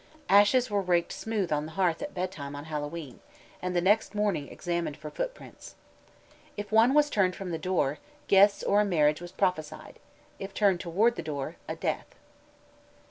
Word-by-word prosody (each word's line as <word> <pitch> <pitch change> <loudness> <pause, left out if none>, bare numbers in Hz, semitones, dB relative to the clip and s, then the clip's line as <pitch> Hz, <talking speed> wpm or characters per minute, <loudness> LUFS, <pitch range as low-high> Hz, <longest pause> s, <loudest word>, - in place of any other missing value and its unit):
Ashes 210 +5 +5
were 205 -1 +1
raked 175 -2 +1
smooth 210 -6 -3
on 150 0 0
the 160 - -11
hearth 175 -2 +1
at 290 - -6
bedtime 165 -6 -4
on 145 +1 -7
Hallowe'en, 150 -2 -6 0.4
and 180 0 -3
the 175 - +3
next 210 +2 +2
morning 205 -9 0
examined 170 -4 -3
for 150 - -8
footprints. - - -7 0.8
If 205 0 -6
one 230 +5 +5
was 295 0 +5
turned 190 -9 +1
from 190 -2 -6
the 165 - -3
door, 155 -5 0 0.3
guests 200 +1 +5
or 205 +1 +3
a - - +3
marriage 155 -5 +2
was 175 0 -8
prophesied; 155 -6 -2 0.4
if 195 0 -7
toward 200 +3 +2
the - - -2
door, 145 -3 -5
a - - -3
death. - - -3
185 Hz, 170 wpm, -28 LUFS, 160-205 Hz, 0.8 s, Ashes